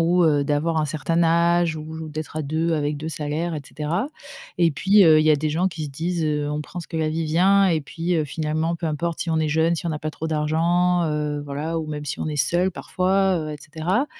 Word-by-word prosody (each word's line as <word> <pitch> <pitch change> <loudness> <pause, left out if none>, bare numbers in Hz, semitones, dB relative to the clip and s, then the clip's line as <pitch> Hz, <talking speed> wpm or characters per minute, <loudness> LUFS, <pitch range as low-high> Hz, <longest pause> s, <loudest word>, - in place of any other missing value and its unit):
ou, 175 +1 +3
heu, 145 -2 +3
d'avoir 150 +3 0
un 155 - +1
certain 155 +3 0
âge 170 0 +3
ou 160 +1 -7
d'être 155 +1 -6
à 155 - -1
2 160 +3 -1
avec 150 -1 0
2 155 +2 -5
salaires 155 +2 -3
et 150 - -3
cetera 165 - -3 0.5
et 165 -3 +4
puis, 195 +7 +5
heu, 155 -2 +7
il - - +1
y 155 - +6
a 150 - +5
des 155 +2 -1
gens 170 +5 +1
qui 165 -3 -6
se 145 - -6
disent: 165 +4 -2
«Heu, 150 -1 -1
on 150 0 -2
prend 175 +4 -7
ce - - -11
que 165 - -5
la 160 -1 0
vie 160 +1 -1
vient 190 +5 +4
et 160 -3 +1
puis, 170 +4 -3
heu, 155 - +1
finalement 155 +3 -1
peu 170 0 -4
importe 160 +2 -2
si 170 - -2
on 160 - +1
est 155 -1 +1
jeunes, 160 +2 +2
si 170 - -5
on 165 - -1
a 150 - -3
pas 155 - -3
trop 160 - -5
d'argent, 170 +3 +1
heu, 150 -1 -2
voilà, 150 +4 -3
ou 160 - -4
même 150 -1 -5
si 145 - -4
on - - -3
est 155 - -3
seul 175 +6 +1
parfois, 190 +1 +1
heu, 155 -1 -4
et - - -6
cetera». 165 - -1
160 Hz, 260 wpm, -23 LUFS, 150-170 Hz, 0.5 s, heu